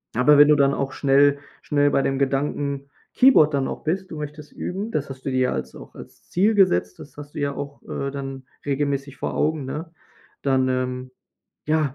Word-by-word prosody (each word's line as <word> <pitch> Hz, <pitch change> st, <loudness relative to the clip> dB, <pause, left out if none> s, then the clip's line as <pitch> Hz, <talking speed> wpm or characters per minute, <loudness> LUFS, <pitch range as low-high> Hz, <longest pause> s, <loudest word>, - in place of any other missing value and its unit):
Aber 145 Hz, +4 st, +5 dB
wenn 145 Hz, -, +8 dB
du 150 Hz, -, +6 dB
dann 140 Hz, -1 st, +3 dB
auch 135 Hz, -1 st, -2 dB
schnell 140 Hz, 0 st, +3 dB, 0.2 s
schnell 145 Hz, -1 st, +2 dB
bei 140 Hz, -, +2 dB
dem 135 Hz, 0 st, -1 dB
Gedanken 140 Hz, 0 st, -1 dB, 0.2 s
Keyboard 245 Hz, -, +6 dB
dann 135 Hz, -1 st, 0 dB
auch -, -, -6 dB
bist, 190 Hz, +4 st, -2 dB
du 160 Hz, -, -6 dB
möchtest 150 Hz, 0 st, -8 dB
üben, 200 Hz, +5 st, -4 dB
das 150 Hz, -6 st, -2 dB
hast 130 Hz, -1 st, -9 dB
du -, -, 0 dB
dir 130 Hz, -, +1 dB
ja 125 Hz, -, +2 dB
als 65 Hz, -1 st, -5 dB
auch -, -, -12 dB
als -, -, -14 dB
Ziel 210 Hz, +5 st, +2 dB
gesetzt, 90 Hz, -, +2 dB
das 145 Hz, -, -12 dB
hast 145 Hz, 0 st, -11 dB
du -, -, -4 dB
ja 140 Hz, -1 st, -1 dB
auch, 140 Hz, 0 st, -7 dB
äh, 140 Hz, -, -4 dB
dann 135 Hz, -1 st, -6 dB, 0.2 s
regelmäßig 140 Hz, -1 st, -2 dB
vor -, -, -4 dB
Augen, 155 Hz, -2 st, 0 dB
ne? 155 Hz, +5 st, -6 dB, 0.5 s
Dann, 130 Hz, -2 st, +2 dB
ähm, 130 Hz, 0 st, -2 dB, 0.6 s
ja, 155 Hz, -3 st, +1 dB
140 Hz, 205 wpm, -23 LUFS, 135-150 Hz, 0.6 s, wenn